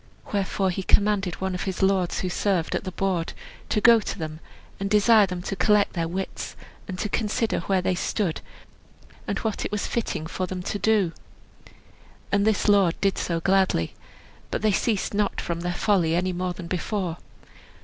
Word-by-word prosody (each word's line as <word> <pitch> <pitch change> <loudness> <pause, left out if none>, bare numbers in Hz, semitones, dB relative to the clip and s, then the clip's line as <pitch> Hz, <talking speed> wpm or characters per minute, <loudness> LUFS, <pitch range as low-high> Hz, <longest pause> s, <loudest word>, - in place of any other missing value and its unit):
Wherefore 195 -1 0
he 185 - -3
commanded 200 -2 +2
one 190 0 -3
of 180 - -3
his 190 -1 -2
lords, 190 -2 +2
who 185 - -1
served 180 -2 0
at - - -2
the 185 - -3
board, 185 -3 -1 0.4
to - - +2
go 230 +2 +7
to 210 - -5
them 155 -2 -5 0.4
and 195 0 -2
desire 210 0 +5
them 180 -1 -5
to 195 - -3
collect 205 +2 +3
their 165 -2 -1
wits, 190 +3 -4 0.3
and 185 -3 -5
to 210 - -1
consider 220 +2 0
where 190 -2 0
they 185 - +2
stood, 180 -1 -1 0.9
and - - -1
what 220 -2 -2
it - - -3
was 210 -1 -1
fitting 220 -9 -2
for 185 +2 -3
them 180 -1 -5
to 205 - -3
do. 210 -6 +3 1.2
And 200 +1 +3
this 220 0 +2
lord 195 -4 +4
did 195 -1 +1
so 170 -1 -1
gladly. 190 - +2 0.6
But - - -3
they 215 - +4
ceased 210 +1 0
not 205 0 0
from 170 -1 -3
their 175 +1 -2
folly 175 -3 +2
any 180 +1 0
more 180 0 -2
than 175 0 -8
before. 180 0 -2
190 Hz, 185 wpm, -25 LUFS, 180-205 Hz, 1.2 s, go